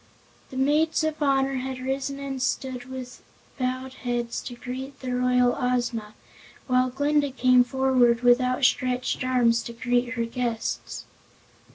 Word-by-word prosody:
The 260 Hz, -, -8 dB
maids 305 Hz, +4 st, +2 dB
of 315 Hz, 0 st, -2 dB
honor 270 Hz, -1 st, +2 dB
had 260 Hz, 0 st, -4 dB
risen 270 Hz, +2 st, -3 dB
and 275 Hz, -2 st, -5 dB
stood 255 Hz, -1 st, -2 dB
with 260 Hz, -1 st, -8 dB, 0.4 s
bowed 255 Hz, +1 st, -2 dB
heads 240 Hz, -1 st, -2 dB
to 245 Hz, -, -6 dB
greet 260 Hz, +3 st, -7 dB
the 255 Hz, -1 st, -4 dB
royal 250 Hz, 0 st, +3 dB
Ozma, 240 Hz, -4 st, -1 dB, 0.5 s
while 255 Hz, 0 st, +2 dB
Glinda 285 Hz, +2 st, +1 dB
came 255 Hz, -1 st, +4 dB
forward 250 Hz, -2 st, +2 dB
with 245 Hz, +1 st, +5 dB
outstretched 255 Hz, 0 st, +1 dB
arms 240 Hz, -2 st, +3 dB
to 235 Hz, -, -7 dB
greet 245 Hz, +1 st, 0 dB
her 235 Hz, -1 st, 0 dB
guests. 230 Hz, -1 st, -3 dB
255 Hz, 140 wpm, -25 LUFS, 245-265 Hz, 0.5 s, with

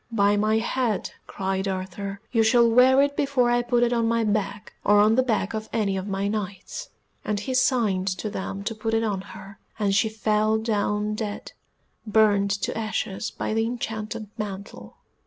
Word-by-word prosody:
"By 205 Hz, -2 st, +3 dB
my 215 Hz, +1 st, +2 dB
head," 235 Hz, -1 st, -1 dB, 0.2 s
cried 190 Hz, 0 st, -2 dB
Arthur, 195 Hz, +1 st, -4 dB
"you 230 Hz, -, +3 dB
shall 235 Hz, +1 st, +5 dB
wear 255 Hz, +4 st, +6 dB
it 285 Hz, 0 st, -1 dB
before 275 Hz, -4 st, +2 dB
I 240 Hz, 0 st, +3 dB
put 240 Hz, 0 st, +1 dB
it 240 Hz, 0 st, +2 dB
on 230 Hz, -1 st, +1 dB
my 230 Hz, 0 st, +1 dB
back, 210 Hz, -1 st, -2 dB
or 205 Hz, 0 st, +5 dB
on 210 Hz, +1 st, +5 dB
the 255 Hz, -, +4 dB
back 225 Hz, -5 st, -1 dB
of 220 Hz, 0 st, -4 dB
any 205 Hz, -4 st, 0 dB
of 190 Hz, +1 st, -4 dB
my 195 Hz, 0 st, -1 dB
Knights," 205 Hz, -, -5 dB, 0.3 s
and 210 Hz, -1 st, -1 dB
he 260 Hz, +6 st, -4 dB
signed 235 Hz, -7 st, +2 dB
to 215 Hz, -, -4 dB
them 195 Hz, -1 st, -5 dB
to 225 Hz, -, -2 dB
put 225 Hz, +1 st, -2 dB
it 225 Hz, -, +1 dB
on 205 Hz, -4 st, -1 dB
her, 200 Hz, 0 st, -12 dB, 0.2 s
and 205 Hz, -2 st, +1 dB
she 210 Hz, +3 st, +3 dB
fell 215 Hz, 0 st, +1 dB
down 210 Hz, -1 st, -1 dB
dead, 210 Hz, -1 st, -5 dB, 0.6 s
burnt 205 Hz, -2 st, +3 dB
to -, -, -1 dB
ashes 215 Hz, -2 st, -3 dB
by -, -, -4 dB
the 225 Hz, +1 st, +1 dB
enchanted 220 Hz, -2 st, -4 dB
mantle. 200 Hz, -2 st, -7 dB
215 Hz, 185 wpm, -25 LUFS, 200-230 Hz, 0.6 s, wear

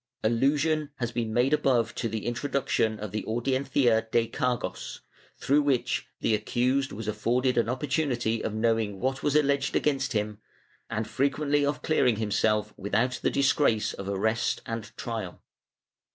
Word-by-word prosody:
Allusion 145 Hz, +6 st, +2 dB
has 120 Hz, -3 st, -3 dB
been 115 Hz, -2 st, -2 dB
made 125 Hz, +5 st, +2 dB
above 120 Hz, -6 st, +2 dB
to 115 Hz, -, -2 dB
the 110 Hz, 0 st, -4 dB
intro 120 Hz, +4 st, -2 dB
duction 110 Hz, -5 st, +1 dB
of 105 Hz, -2 st, -6 dB
the 110 Hz, -, -3 dB
audiencia 120 Hz, -1 st, +1 dB
de 115 Hz, -1 st, +2 dB
cargos, 125 Hz, 0 st, -3 dB, 0.4 s
through 145 Hz, +2 st, +3 dB
which 140 Hz, -4 st, 0 dB
the 115 Hz, -, +2 dB
accused 125 Hz, +5 st, 0 dB
was 105 Hz, +2 st, -6 dB
afforded 120 Hz, +5 st, +1 dB
an 120 Hz, -1 st, +2 dB
opportunity 130 Hz, -4 st, -1 dB
of -, -, -1 dB
knowing 110 Hz, -2 st, 0 dB
what 130 Hz, +3 st, -1 dB
was 145 Hz, -1 st, 0 dB
alleged 140 Hz, -2 st, +2 dB
against 135 Hz, -3 st, +1 dB
him, 105 Hz, -1 st, -2 dB, 0.5 s
and 110 Hz, -1 st, -2 dB
frequently 145 Hz, +2 st, +1 dB
of 145 Hz, +1 st, -1 dB
clearing 125 Hz, -7 st, +3 dB
himself 105 Hz, 0 st, 0 dB
without 115 Hz, +6 st, 0 dB
the -, -, +2 dB
disgrace 135 Hz, -5 st, +2 dB
of 100 Hz, 0 st, -6 dB
arrest 110 Hz, +4 st, 0 dB
and 115 Hz, -1 st, -4 dB
trial. 110 Hz, -7 st, -5 dB
120 Hz, 150 wpm, -27 LUFS, 110-135 Hz, 0.5 s, through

